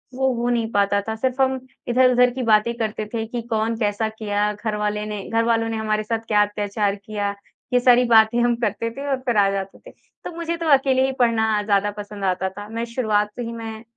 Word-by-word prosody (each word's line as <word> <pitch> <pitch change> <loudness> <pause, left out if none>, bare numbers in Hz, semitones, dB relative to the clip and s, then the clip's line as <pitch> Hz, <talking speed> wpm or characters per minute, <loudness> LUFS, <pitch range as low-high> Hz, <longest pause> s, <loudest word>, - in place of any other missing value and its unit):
वो 265 -1 +1
हो 240 +1 -1
नहीं 230 -2 0
पाता 200 0 +2
था। 220 - -2
सिर्फ़ 260 +3 -1
हम 265 0 +2 0.3
इधर-उधर 250 0 +4
की 255 -1 -3
बातें 220 +1 +3
करते 215 -1 -3
थे 225 -1 -2
कि 235 0 -4
कौन 225 +1 0
कैसा 210 0 0
किया, 210 -1 -1
घरवाले 210 0 -2
ने 210 -2 -5
घरवालों 225 0 +1
ने 225 - -2
हमारे 215 -1 -1
साथ 225 +1 -2
क्या 210 -1 +3
अत्याचार 205 0 -2
किया। 205 0 -4 0.4
ये 250 - +5
सारी 245 0 +5
बातें 225 +1 +5
हम 240 0 +2
करते 230 -1 -2
थे 285 +1 -5
और 265 - +1
फ़िर 240 -4 -1
आ 200 -1 +5
जाते 195 -1 -5
थे। - - -11 0.3
तो - - -4
मुझे 335 0 -3
तो 335 - -4
अकेले 265 -1 +3
ही 265 - 0
पढ़ना 220 -3 +2
ज़्यादा 205 0 +1
पसंद 205 -1 -7
आता 185 0 0
था। 205 +2 -9
मैं 230 +1 -3
शुरुआत 215 -3 0
से 245 - -5
ही 230 - -5
मैं 225 -1 -7
220 Hz, 220 wpm, -22 LUFS, 210-240 Hz, 0.4 s, ये